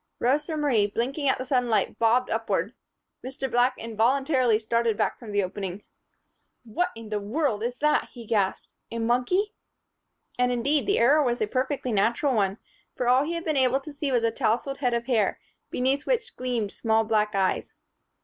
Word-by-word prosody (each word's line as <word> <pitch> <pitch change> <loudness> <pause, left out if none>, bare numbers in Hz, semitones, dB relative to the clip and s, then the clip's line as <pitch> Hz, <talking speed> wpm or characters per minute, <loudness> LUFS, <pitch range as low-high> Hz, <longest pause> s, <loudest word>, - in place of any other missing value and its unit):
Rosa 295 +5 0
Marie, 250 -9 +2
blinking 265 +7 -1
at - - +2
the 255 - -5
sudden 250 -2 +1
light, 220 - 0
bobbed 235 +2 +2
upward. - - -1 0.5
Mr. 265 +1 -4
Black 245 +1 +3
involuntarily 245 +2 +2
started 230 0 0
back - - -1
from 225 -3 -9
the 205 -1 +1
opening. 190 +1 -5 0.8
"What 240 +10 -1
under 215 -2 -4
heavens 220 +1 -1
is 245 +1 -3
that!" 300 0 +2
he 235 -2 -11
gasped. 205 -3 -1 0.2
"A 230 - -5
monkey?" 250 - +1 0.9
And, 250 0 +3
indeed, 275 +6 +1
the 405 - +2
error 285 +6 +5
was 245 -3 0
a - - +1
perfectly 255 +3 -2
natural 235 +7 +2
one, 200 -3 +1 0.4
for 250 - -2
all 255 +2 +5
he 335 - -3
had 335 0 -4
been 310 -2 0
able 260 0 +3
to 300 +1 -10
see 285 -1 -2
was 240 -2 +2
a 230 - +2
tousled 250 +3 -1
head 250 -3 +1
of 235 0 -2
hair, 225 -6 +1 0.3
beneath 265 +3 0
which - - -1
gleamed 240 -5 -2
small 225 -1 +1
black 215 -1 0
eyes. 190 -1 0
245 Hz, 180 wpm, -26 LUFS, 220-275 Hz, 0.9 s, error